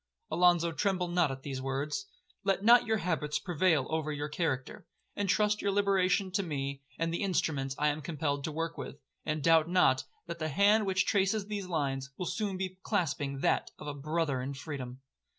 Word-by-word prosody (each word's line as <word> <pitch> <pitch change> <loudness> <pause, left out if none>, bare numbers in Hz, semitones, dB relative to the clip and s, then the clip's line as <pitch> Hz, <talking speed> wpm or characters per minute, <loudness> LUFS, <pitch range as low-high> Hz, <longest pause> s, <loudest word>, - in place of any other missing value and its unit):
'Alonzo, 175 -1 +4
tremble 185 +1 0
not 175 -3 +2
at 135 0 -6
these 135 -2 -4
words. 145 +8 -2 0.4
Let 195 0 +1
not 240 +1 +7
your 220 0 +2
habits 155 -5 -1
prevail 165 -4 +2
over 160 -1 -1
your 145 0 -3
character. 145 -5 -3 0.3
Entrust 210 +1 +1
your 200 - 0
liberation 195 -1 +2
to 200 +2 +1
me, 140 -5 -3 0.2
and 165 0 -1
the 170 - -2
instruments 145 -8 0
I 150 0 +2
am 150 +1 -2
compelled 145 -2 -2
to 155 - -3
work 165 +2 -3
with; 145 - -7 0.3
and 155 -1 -1
doubt 165 -1 +5
not, 175 -7 +3 0.2
that 170 0 -6
the 155 -1 -1
hand 205 +6 +4
which 190 -1 +2
traces 200 +1 +1
these 205 -2 -4
lines, 140 -5 -2
will 180 - -3
soon 200 0 -2
be 185 0 -4
clasping 145 -9 -1
that - - +1
of - - -10
a 145 - -3
brother 145 -1 -1
in 135 +2 -4
freedom.' 135 -3 -6
165 Hz, 185 wpm, -31 LUFS, 145-190 Hz, 0.4 s, not